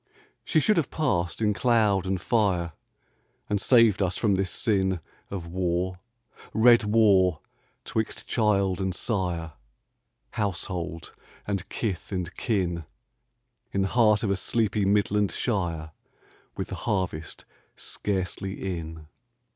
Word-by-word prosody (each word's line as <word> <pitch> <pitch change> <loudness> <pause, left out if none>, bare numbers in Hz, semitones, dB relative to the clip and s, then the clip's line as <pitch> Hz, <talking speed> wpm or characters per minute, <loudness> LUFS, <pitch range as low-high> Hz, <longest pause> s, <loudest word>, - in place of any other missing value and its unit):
She - - +2
should 200 +7 +3
have 165 - +1
passed 110 - -1
in 105 -1 +3
cloud 105 -5 +2
and 95 0 0
fire 90 -6 +1 0.7
And 105 -1 0
saved 115 -6 +5
us 90 -1 0
from 105 -4 +2
this 95 0 0
sin 95 -5 +1 0.3
Of 95 -4 -5
war 90 +1 -1 0.3
— - - -49 0.3
red 120 +1 +6
Avar 100 -6 +4 0.2
— - - -41
'twixt 110 -1 -3
child 100 -4 +1
and 95 -1 -1
sire, 90 -7 -2 0.8
Household 90 -4 -3 0.3
and 100 -3 -3
kith 100 -5 -3
and 90 -2 -3
kin, 90 -7 -1 0.9
In 95 - +2
the 95 - 0
heart 110 -3 +4
of 100 - +1
a - - +2
sleepy 105 -1 0
Midland 100 0 +2
shire, 85 -8 -2 0.7
With - - -3
the - - -4
harvest 90 -6 -2 0.3
scarcely 95 -1 -3
in. 80 -1 -8
95 Hz, 130 wpm, -26 LUFS, 90-105 Hz, 0.9 s, red